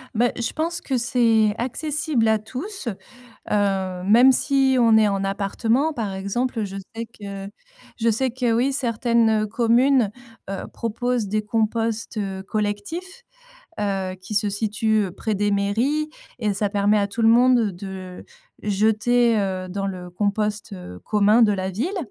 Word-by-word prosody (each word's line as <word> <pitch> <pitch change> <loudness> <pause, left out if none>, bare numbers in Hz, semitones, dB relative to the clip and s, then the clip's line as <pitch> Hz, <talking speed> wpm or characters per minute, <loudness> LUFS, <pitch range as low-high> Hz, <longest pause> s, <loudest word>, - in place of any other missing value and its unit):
Bah, 240 +2 +2
je 235 -2 -2
pense 335 +2 -1
que 265 - -1
c'est 230 -3 +3
accessible 285 0 0
à 220 0 +3
tous, 260 - -5 0.6
heu, 190 -3 0
même 240 +7 +6
si 270 0 +2
on 230 -2 +5
est 215 -1 +5
en 195 -1 -1
appartement, 225 +9 0
par 220 -8 -4
exemple. 220 +4 -2
Je 195 -1 -7 0.2
sais 230 +1 -5
que 200 -3 -8 0.5
je 230 0 +2
sais 255 +4 +1
que 245 -1 0
oui, 250 +4 +2
certaines, 230 -3 +2
heu, - - -2
communes, 235 +1 +3 0.4
heu, 195 - -4
proposent 235 0 -2
des 215 +2 0
composts, 225 +1 -1
heu, 195 -2 -4
collectifs, 215 - -4 0.6
heu, 195 -2 -2
qui 210 +3 -6
se 205 0 +2
situent 215 0 0
près 220 0 -2
des 205 +1 0
mairies 235 +10 0 0.3
et 210 -3 0
ça 200 +1 0
permet 205 +1 +2
à 200 - +1
tout 215 +4 -4
le 225 - +5
monde 240 -2 +4
de 185 0 -8 0.4
jeter, 220 +3 +2
heu, 190 -2 -2
dans 195 +1 -3
le 180 -2 -6
compost, 210 +3 -1
heu, 135 - -9
commun 210 +2 +3
de 220 -2 +5
la 190 -1 -2
ville, 310 - -2
220 Hz, 155 wpm, -22 LUFS, 200-245 Hz, 0.6 s, même